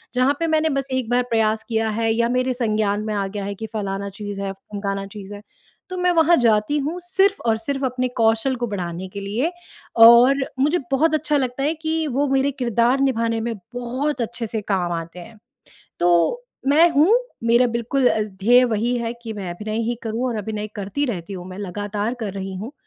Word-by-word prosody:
जहाँ 255 +3 +3
पे 330 - 0
मैंने 315 0 +2
बस 270 - -4
एक 260 -3 -1
बार 245 +1 +2
प्रयास 220 -1 +1
किया 225 -1 0
है 225 +1 0
या 235 +1 +1
मेरे 255 +1 +1
संज्ञान 215 -4 0
में 215 - -2
आ 200 -1 -1
गया 200 0 -5
है 200 0 -4
कि 220 +3 -6
फलाना 200 -1 -3
चीज़ 205 0 -6
है, 195 -1 -2
ढिमकाना 195 0 -5
चीज़ 200 0 -9
है। 205 - -10 0.5
तो 370 - -5
मैं 360 0 +2
वहाँ 330 +1 +5
जाती 225 +4 +2
हूँ 310 +6 -3
सिर्फ़ 385 +3 +2
और 220 - +3
सिर्फ़ 270 +5 -3
अपने 255 0 -1
कौशल 225 +3 +2
को 240 -1 -3
बढ़ाने 180 -3 -4
के 200 - -5
लिए 225 - -1 0.5
और 240 +4 +8 0.2
मुझे 300 +6 +3
बहुत 305 +4 +3
अच्छा 300 -1 +1
लगता 260 0 -2
है 300 +3 +1
कि 320 0 -1
वो 280 +2 0
मेरे 270 +1 +2
किरदार 235 +2 +2
निभाने 230 -4 +1
में 230 - -1 0.2
बहुत 255 +3 -2
अच्छे 230 0 -3
से 220 0 -3
काम 180 -3 0
आते 165 +2 -9
हैं। 220 +5 -12 0.6
तो 175 - +3 0.3
मैं 315 +5 +6
हूँ, 315 +10 +5 0.3
मेरा 235 +2 +4
बिल्कुल 240 +2 +1
अ, 220 - +1
ध्येय 210 +5 +3
वही 235 +1 0
है 230 0 -2
कि 225 - -5
मैं 195 -4 -5
अभिनय 215 +5 -4
ही 240 - 0
करूँ 230 +3 -2
और 235 - -2
अभिनय 210 0 -4
करती 205 +8 -2
रहती 200 -5 -4
हूँ, 180 -2 -7
मैं 185 - -9
लगातार 205 +3 -3
कर 210 -3 -3
रही 195 -1 -5
हूँ। 215 +9 -6
230 Hz, 205 wpm, -22 LUFS, 205-265 Hz, 0.6 s, और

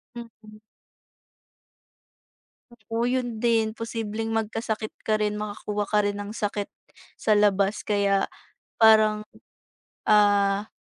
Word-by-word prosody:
Mm. 220 -2 -12 2.1
Oo, 225 0 -4
'yon 245 -3 -2
din. 225 -2 +2
Posibleng 225 -1 -4
mag-kasakit 220 0 -3
ka 215 -1 +1
rin, 210 0 0
maka-kuha 210 0 -4
ka 210 - +3
rin 205 0 -1
ng 205 0 -6
sakit, 205 -2 -3 0.5
sa 215 - +2
labas. 205 -1 +2
Kaya, 200 -1 +1 0.5
parang, 215 -1 +5 0.8
ah, 205 -1 +3
215 Hz, 100 wpm, -25 LUFS, 205-225 Hz, 2.1 s, parang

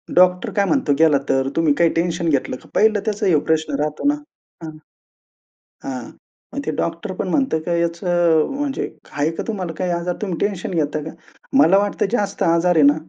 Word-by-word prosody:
Doctor 180 0 +4
काय 200 -1 +2
म्हणतो 220 - +1
गेला 160 -3 +5
तर, 135 0 +1
"तुम्ही 165 -3 +3
काही 170 +1 +3
टेन्शन 170 0 0
घेतलं 140 -3 0
का?" - - -18
पाहिलं 215 -1 +3
त्याचा 210 -1 -1
हा 165 -5 +4
प्रश्न 155 -2 0
राहतो 150 - -1
ना. 290 - +3 0.5
हं. 155 -1 -8 1.1
हां, 125 -3 -5 0.4
मग - - -2
ते - - 0
डॉक्टर 170 - -3
पण 185 - -3
म्हणतं, 265 - +1
की 170 +1 -1
याचं 170 +2 -2 0.4
अ, - - 0
म्हणजे 285 -2 -2 0.2
आहे 145 +2 0
का - - -2
तुम्हाला 190 -7 -3
काही 180 -1 -1
आजार? 175 +1 -2
तुम्ही 190 -5 -2
टेन्शन 195 -4 -5
घेता 150 -2 0
का? 160 - -6 0.5
मला 195 -6 +6
वाटतं 205 0 0
जास्त 200 -4 -1
आजार 170 +1 +3
आहे 155 - +5
ना, 145 - +6
170 Hz, 195 wpm, -20 LUFS, 155-195 Hz, 1.1 s, मला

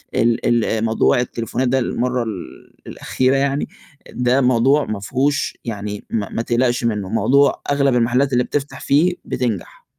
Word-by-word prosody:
ال 115 0 +1
ال 120 -2 +2
آآ 110 -1 -1
موضوع 115 +2 +2
التليفونات 125 +1 -2
ده 130 +1 +2
المرّة 125 0 -1
ال 105 -6 -8
الأخيرة 130 +1 0
يعني 140 +1 0 0.4
ده 125 +2 +1
موضوع 130 +4 +3
ما 105 -2 -4
فيهوش 135 +8 -1
يعني 105 -2 -5
ما 105 -3 -2
ما 115 - -3
تقلَقش 120 +1 0
منُّه، 105 -4 -1
موضوع 140 +5 +2
أغلَب 140 -2 +2
المَحلّات 125 +3 +2
اللي 125 0 +3
بتفتَح 145 +1 -4
فيه 165 +6 +3
بتنجح. 115 -7 -4
125 Hz, 155 wpm, -19 LUFS, 115-135 Hz, 0.4 s, موضوع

